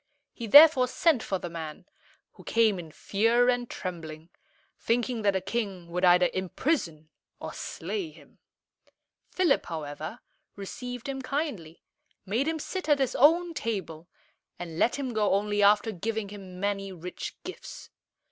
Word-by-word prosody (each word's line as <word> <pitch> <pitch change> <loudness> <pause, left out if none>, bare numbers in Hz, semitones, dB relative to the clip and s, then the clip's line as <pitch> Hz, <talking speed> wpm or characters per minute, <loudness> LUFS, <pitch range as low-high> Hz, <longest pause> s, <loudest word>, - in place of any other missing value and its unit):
He 235 - -6
therefore 285 0 +8
sent 300 0 +2
for 195 - -2
the 180 - -6
man, 160 -3 -7 0.5
who - - -16
came 220 -4 +2
in 165 -2 -8
fear 230 +8 +2
and 245 -1 0
trembling, 165 -2 -7 0.5
thinking 235 0 0
that 200 -1 +2
the 190 - 0
king 195 -4 -4
would 180 +2 -2
either 180 0 +5
imprison 185 - -2 0.3
or - - -6
slay 385 -6 -4
him. - - -19 0.9
Philip, 360 -6 +1
however, 155 - -6 0.3
received 245 +5 -7
him 270 -1 -4
kindly, 255 - -4 0.4
made 230 +9 0
him 320 0 0
sit 365 +2 -5
at 295 - +5
his 270 -2 0
own 335 +5 +4
table, 175 - -4 0.5
and 170 -2 -7
let 235 - +3
him 265 -3 -3
go 210 -3 +2
only 205 +1 0
after 210 +2 +4
giving 215 +2 -3
him 190 -3 -10
many 195 0 -2
rich 180 0 -7
gifts. - - -9
210 Hz, 145 wpm, -28 LUFS, 180-250 Hz, 0.9 s, therefore